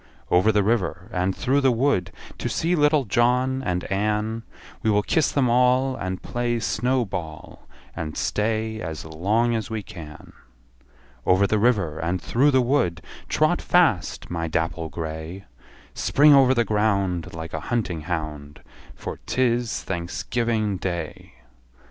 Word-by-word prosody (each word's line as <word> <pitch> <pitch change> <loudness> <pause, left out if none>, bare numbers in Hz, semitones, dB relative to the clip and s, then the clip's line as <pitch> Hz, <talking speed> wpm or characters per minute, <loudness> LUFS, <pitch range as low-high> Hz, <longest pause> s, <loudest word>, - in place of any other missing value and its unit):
Over 90 +5 +5
the 105 -1 +2
river, 95 -5 -1
and 90 +1 0
through 140 +3 +1
the 135 -2 +4
wood, 115 -8 +1 0.3
To - - -2
see 170 +2 0
little 150 -3 +3
John 125 +4 +2
and 90 -7 -2
Ann; 105 +3 0 0.4
We 110 - +1
will 105 -1 +3
kiss 160 - +1
them 135 -3 +2
all, 125 +2 +3
And 95 -5 -4
play 120 -1 -1
snow 125 +2 0
ball, 80 -6 -7 0.3
And 75 -2 -5
stay 110 +1 -1
as 80 -1 -5
long 105 +10 +1
as 115 0 -2
we 110 -2 -4
can. 80 -8 -11 0.9
Over 95 +2 +4
the 110 +1 +1
river, 100 -9 +1
and 85 +3 -1
through 130 +10 +2
the 130 -2 +3
wood, 120 -11 0 0.3
Trot - - +2
fast, - - +1
my 85 -1 -2
dapple 80 0 -2
grey! 80 +4 -6 0.5
Spring 145 +1 +5
over 130 -1 +6
the 120 -1 +2
ground, 100 -6 0
Like 80 0 -7
a 80 - -2
hunting 105 -9 -1
hound, 75 -2 -5 0.3
For - - -6
't - - -3
is 120 -2 +1
Thanksgiving 105 +4 -2
Day! 85 -8 -5
105 Hz, 150 wpm, -24 LUFS, 85-120 Hz, 0.9 s, over